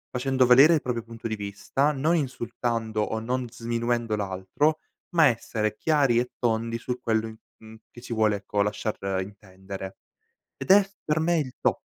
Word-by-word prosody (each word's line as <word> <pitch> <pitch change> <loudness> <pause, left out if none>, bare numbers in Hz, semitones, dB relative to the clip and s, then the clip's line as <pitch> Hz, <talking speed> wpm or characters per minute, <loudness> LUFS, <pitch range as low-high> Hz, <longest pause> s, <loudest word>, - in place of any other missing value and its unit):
facendo 130 0 +2
valere 135 +7 +7
il 150 - 0
proprio 120 -2 -3
punto 115 -1 -7
di 110 - -2
vista, 105 +8 -1
non 150 +5 +1
insultando 115 -5 -2
o 110 +1 -1
non 125 +1 -2
sminuendo 120 -1 -1
l'altro 100 +11 -1 0.4
ma 160 -2 +7
essere 110 -3 -1
chiari 140 -6 +2
e 125 - -2
tondi 115 -1 0
su 125 +1 -4
quello 110 -1 0
in 110 0 -10 0.2
mhmm, 110 0 -13 0.2
che 120 - -12
ci 120 -1 -6
vuole 110 -2 +2
ecco 100 +1 -2
lasciar 105 +1 -2 0.2
intendere. 95 -1 -9 0.6
Ed - - 0
è 195 0 +6 0.2
per 155 +1 +1
me 170 +1 +2
il 130 -4 -4
top. - - +1
115 Hz, 170 wpm, -26 LUFS, 110-130 Hz, 0.6 s, valere